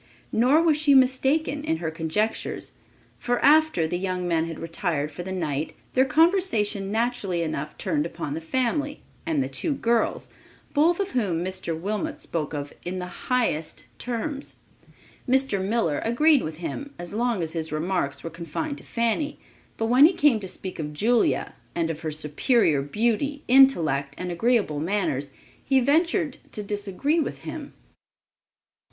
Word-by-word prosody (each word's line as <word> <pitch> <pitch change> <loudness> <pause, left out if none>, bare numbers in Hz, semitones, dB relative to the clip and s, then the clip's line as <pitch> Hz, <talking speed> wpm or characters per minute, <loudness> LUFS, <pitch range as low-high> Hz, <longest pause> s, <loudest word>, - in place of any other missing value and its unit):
Nor 260 +8 +4
was 315 -3 +4
she 300 -2 +4
mistaken 270 +3 +3
in 160 - 0
her 160 -1 -3
conjectures, 165 +7 -2 0.5
for 245 0 0
after 305 - +5
the 175 +2 -2
young 185 -1 -2
men 165 -1 +1
had 165 - -6
retired 165 -3 -2
for 165 - -7
the 190 +2 -6
night, 155 -5 -2 0.2
their 260 +1 +4
conversation 265 - +2
naturally 220 -6 0
enough 155 -1 -4
turned 295 -1 0
upon 145 - -5
the 160 - -4
family 260 - -1 0.2
and 310 -4 +1
the - - -3
two 320 - -1
girls, 235 -4 0 0.5
both 330 +5 +3
of 395 -1 -1
whom 180 -8 0
Mr. 185 -3 -4
Wilmot 215 - -3
spoke 160 - -3
of 145 -1 -5
in 180 +1 -4
the 180 0 -8
highest 230 -11 0
terms. 270 +4 -4 0.7
Mr. 260 -7 +2
Miller 195 -7 0
agreed 285 +5 +4
with 155 0 -4
him 280 - -6
as 175 +1 -7
long 230 -4 0
as 160 - -4
his 160 -2 -2
remarks 155 -2 -1
were 165 - -5
confined 170 - -4
to - - -15
Fanny, 235 +6 -1 0.4
but 225 - 0
when 250 +5 +7
he 360 - 0
came 290 -9 +3
to 195 - -6
speak 185 0 -6
of 150 -1 -4
Julia, 225 +9 +1 0.2
and 165 -1 0
of 155 - -6
her 160 -1 -3
superior 155 - +2
beauty, 235 - -1
intellect 165 - +4
and 180 -1 -4
agreeable 205 -5 +1
manners, 160 -6 -1 0.3
he 270 -1 +3
ventured 315 +3 +2 0.2
to 210 - -4
disagree 205 - -1
with 315 - -3
him. - - -7
210 Hz, 160 wpm, -25 LUFS, 165-270 Hz, 0.7 s, when